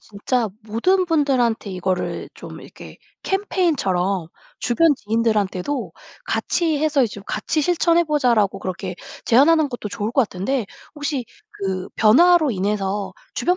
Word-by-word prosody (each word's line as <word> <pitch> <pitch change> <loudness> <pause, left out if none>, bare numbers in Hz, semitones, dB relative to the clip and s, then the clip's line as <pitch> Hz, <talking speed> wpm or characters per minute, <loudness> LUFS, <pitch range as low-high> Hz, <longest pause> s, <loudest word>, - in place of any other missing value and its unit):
진짜 220 +3 -2
모든 360 - +1
분들한테 260 - +1
이거를 185 0 -2
좀 - - -10
이렇게 - - -13 0.2
캠페인처럼 200 - 0 0.3
주변 290 +6 +3
지인들한테도 220 +2 -1 0.3
'같이 325 -4 0
해서 300 -2 +2
이제 230 - -1
좀 200 - -9
같이 300 +8 -1
실천해 345 +1 +3
보자.'라고 240 -10 +2
그렇게 185 0 -5 0.3
제안하는 295 +5 +4
것도 240 -3 -5
좋을 210 +2 -3
것 265 - +3
같은데 215 +4 -2 0.3
혹시 290 -4 -3 0.3
그 190 -2 -4
변화로 315 +8 +5
인해서 200 0 -2 0.2
주변 360 +1 +1
235 Hz, 310 characters per minute, -21 LUFS, 200-305 Hz, 0.3 s, 변화로